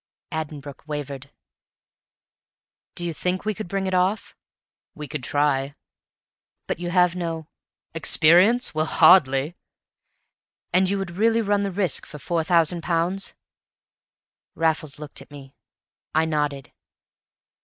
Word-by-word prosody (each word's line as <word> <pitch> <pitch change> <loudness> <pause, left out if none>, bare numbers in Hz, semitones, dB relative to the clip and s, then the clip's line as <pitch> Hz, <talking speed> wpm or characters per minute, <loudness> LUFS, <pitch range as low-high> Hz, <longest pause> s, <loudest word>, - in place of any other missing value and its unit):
Addenbrooke 150 -3 -6
wavered. 145 -3 -5 1.7
"Do 175 - -1
you 170 - -2
think 180 +4 -2
you 215 - 0
could 215 -1 -6
bring 195 +2 -2
it 190 - -2
off?" 185 +4 0 0.6
"We 150 -1 -7
could 125 - -5
try." 140 0 0 0.9
"But - - -3
you 175 0 -3
have 180 -1 +3
no 165 -3 -4 0.2
" - - -58
"Experience? 175 +9 +4
Well, 155 0 0
hardly!" 155 -2 +5 1.2
"And 185 +1 +4
you 200 - 0
would 195 -3 -4
really 225 +2 +3
run 205 -1 +1
the 200 - -1
risk 190 -1 -1
for 150 - -9
four 165 +3 -1
thousand 170 +1 +2
pounds?" 175 +3 -1 1.2
Raffles 160 -2 0
looked 150 -2 -8
at 135 - -15
me. 140 -2 -12 0.6
I 160 +1 +4
nodded. 150 -3 -2
165 Hz, 130 wpm, -24 LUFS, 150-185 Hz, 1.7 s, hardly